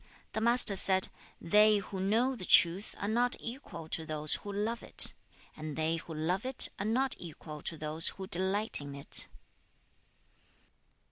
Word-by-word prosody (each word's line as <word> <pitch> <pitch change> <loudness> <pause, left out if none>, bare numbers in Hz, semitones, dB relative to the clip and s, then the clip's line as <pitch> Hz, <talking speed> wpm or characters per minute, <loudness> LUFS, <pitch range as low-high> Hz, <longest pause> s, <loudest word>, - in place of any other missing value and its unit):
The 220 - -3
Master 235 -3 +5
said, 190 0 +3 0.3
'They 210 +4 +3
who 195 -1 -7
know 225 +7 0
the 195 - -10
truth 180 +3 +3
are 200 - -5
not 240 +3 0
equal 230 - -8
to 160 - -4
those 155 -1 +3
who 205 - -9
love 215 +4 -4
it, - - +1 0.4
and 155 -1 -8
they 160 +1 -1
who 165 -1 -9
love 175 +6 -2
it 260 0 +3
are 200 - -4
not 260 +4 0
equal 155 -2 -10
to 165 - -5
those 155 +2 +4
who 190 - -2
delight 190 +2 -1
in 140 -1 -9
it.' 140 - +1
190 Hz, 160 wpm, -30 LUFS, 160-220 Hz, 0.4 s, Master